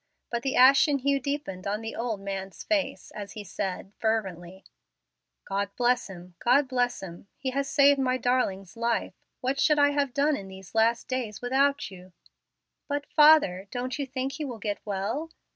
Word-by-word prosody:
But 235 -1 -1
the 270 0 -1
ashen 275 +3 +6
hue 275 +1 +1
deepened 250 -10 -4
on 205 +2 -1
the 225 0 -6
old 225 -4 -3
man's 195 -1 -5
face, 290 -4 -1
as 205 -1 -7
he 215 - -7
said, 190 0 -4
fervently, 190 -5 -2 0.8
"God 200 0 -2
bless 245 0 +2
him! 180 -1 -11
God 265 +4 +3
bless 245 -4 0
him! 175 +1 -9
He 260 -1 -3
has 275 +1 -1
saved 280 0 +5
my 255 -1 +1
darling's 215 -7 -1
life. 230 0 -1 0.3
What 265 +2 -1
should 300 -2 +4
I 285 0 +5
have 285 -2 0
done 290 +1 +3
in 195 -7 -7
these 190 0 -12
last 225 +1 +2
days 255 -6 -3
without 270 -1 +1
you?" 185 -1 -13 0.7
"But, 285 0 -2
father, 295 - +6
don't 250 +4 -4
you 280 - -2
think 260 +1 -3
he 305 +3 -5
will 250 -5 -5
get 210 -1 -3
well?" 215 +10 -2
245 Hz, 175 wpm, -27 LUFS, 195-275 Hz, 0.8 s, ashen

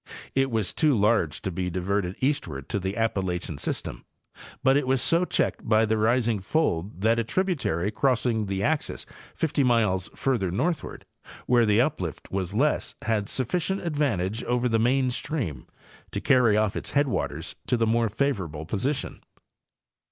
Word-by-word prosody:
It 135 0 +2
was 110 -6 -1
too 150 -4 +3
large 105 -7 +1
to 95 - -2
be 90 +1 -2
diverted 90 +1 -1
eastward 100 - -1
to 100 - 0
the 95 +3 -3
Appalachian 90 -8 -1
system, - - -4 0.6
but 135 +1 +5
it 145 -2 +1
was 130 0 +2
so 165 +8 +2
checked - - -1
by 110 0 +5
the 110 0 +1
rising 115 0 +2
fold 95 - -1
that 115 +2 +3
a - - +1
tributary 125 - 0
crossing 115 -3 +1
the 95 0 -2
axis 155 +5 -1 0.3
50 150 -3 +1
miles 110 -7 +2
further 120 -9 0
northward, 160 - -2 0.4
where 120 -2 +4
the 105 +1 +4
uplift 95 - -3
was 95 0 -2
less, 145 +6 +1
had 110 -2 0
sufficient 180 - -1
advantage 120 - -1
over 125 0 +1
the 115 -2 +2
main 125 +2 +2
stream 120 - -3 0.4
to - - -3
carry 120 -6 +4
off 105 -2 +1
its - - -3
headwaters 140 -3 -1
to 125 - +2
the 115 - +2
more 115 0 +2
favorable 95 - -2
position. 125 - -2
115 Hz, 160 wpm, -26 LUFS, 95-135 Hz, 0.6 s, but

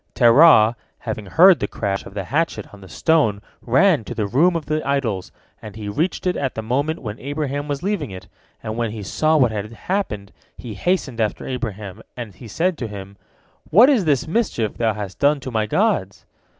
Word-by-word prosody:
Terah, 120 -2 +6 0.2
having 110 -3 -6
heard 175 - +6
the - - -1
crash 100 -2 -3
of 100 - -13
the 100 - -3
hatchet 140 - -2
on 100 - -13
the 95 - -13
stone, 150 -11 +1 0.2
ran 150 - +3
to - - -6
the 110 - -1
room 155 - +3
of 165 -3 -3
the 155 0 -1
idols, 125 -9 -2 0.3
and 105 -2 -10
he 105 -2 -7
reached 155 - -2
it 180 -1 +1
at 135 -3 -2
the 110 - -4
moment 140 +7 -1
when 105 -1 -6
Abraham 145 0 -3
was 145 +1 -4
leaving 195 -8 -2
it, 95 -1 -10 0.4
and 110 - -4
when 115 -1 -1
he 105 -1 -7
saw 155 +10 +1
what 125 -6 +3
had 105 0 -5
happened, 110 - -3 0.3
he 115 -3 -8
hastened 135 - -1
after 105 -2 -2
Abraham, 110 -6 -5 0.2
and 115 -5 -7
he 115 - -12
said 165 - -1
to 115 - -3
him, 100 -1 -9 0.5
"What 235 - +7
is 230 -10 +2
this 150 0 +1
mischief 160 - -1
thou 110 -3 0
hast 100 -3 -7
done 145 +1 +3
to 130 - -6
my 110 -2 0
gods?" - - 0
120 Hz, 200 wpm, -21 LUFS, 105-155 Hz, 0.5 s, What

